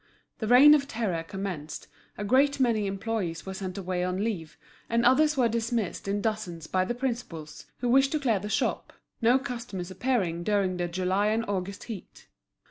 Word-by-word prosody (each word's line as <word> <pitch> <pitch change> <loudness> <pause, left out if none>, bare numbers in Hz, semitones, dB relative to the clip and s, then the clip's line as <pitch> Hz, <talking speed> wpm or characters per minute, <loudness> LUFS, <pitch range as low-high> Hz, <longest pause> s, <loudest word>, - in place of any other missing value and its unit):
The 220 - -2
reign 260 +6 +9
of 280 -2 +3
terror 215 -10 -2
commenced, 175 -3 -6 0.3
a 205 - -4
great 275 +6 +3
many 225 -5 +2
employees 195 -4 -3
were 190 - -5
sent 190 -1 -5
away 180 -2 -2
on 185 +2 -1
leave, 180 -9 -4 0.3
and 235 +1 +2
others 300 +4 +4
were 250 -3 +4
dismissed 230 -4 -2
in 200 +1 0
dozens 185 -7 -3
by 185 +3 +1
the 240 - -2
principals, 235 - -5
who 245 - 0
wished 270 +2 +4
to 310 - +1
clear 235 -8 +1
the 210 +2 -6
shop, - - -1 0.3
no 235 +3 +5
customers 235 -8 -5
appearing 190 -7 0
during 195 -2 +1
the 175 0 -1
July 185 +3 0
and 225 +2 +1
August 200 0 -3
heat. 220 -6 -9
210 Hz, 180 wpm, -28 LUFS, 185-240 Hz, 0.3 s, reign